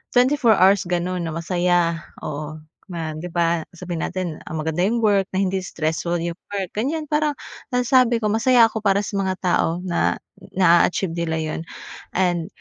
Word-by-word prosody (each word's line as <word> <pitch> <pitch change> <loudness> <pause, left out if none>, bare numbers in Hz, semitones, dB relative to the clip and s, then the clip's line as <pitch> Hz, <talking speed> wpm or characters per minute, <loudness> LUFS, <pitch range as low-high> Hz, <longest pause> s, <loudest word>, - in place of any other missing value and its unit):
24 245 -2 +4
hours 190 -1 +4
ganun 175 0 -1
na 160 - -4
masaya, 175 0 +1 0.2
oo, 150 +1 -5 0.3
ma 165 -3 -4
'di 155 +3 -6
ba? 170 -1 0
Sabihin 175 -1 -5
natin, 180 -4 -4
ah, 160 - -5
maganda 160 +1 -2
yung 230 +1 0
work 200 -3 +3
na 195 - +2
hindi 190 0 0
stressful 170 -1 -2
yung 170 +1 -4 0.2
work 190 -2 -3
ganyan, 285 +9 -2
parang 300 -1 +1 0.4
nasasabi 245 -2 +3
ko 210 - +1
masaya 235 +2 +5
ako 220 - -4
para 200 -1 +2
sa 200 0 -3
mga 190 -1 0
tao 180 - +2 0.2
na 175 -2 +1 0.4
na-a-achieve 175 -1 +3
nila 165 -1 -1
yun. 155 0 -3 0.5
And 175 -3 +1
180 Hz, 165 wpm, -22 LUFS, 170-210 Hz, 0.5 s, masaya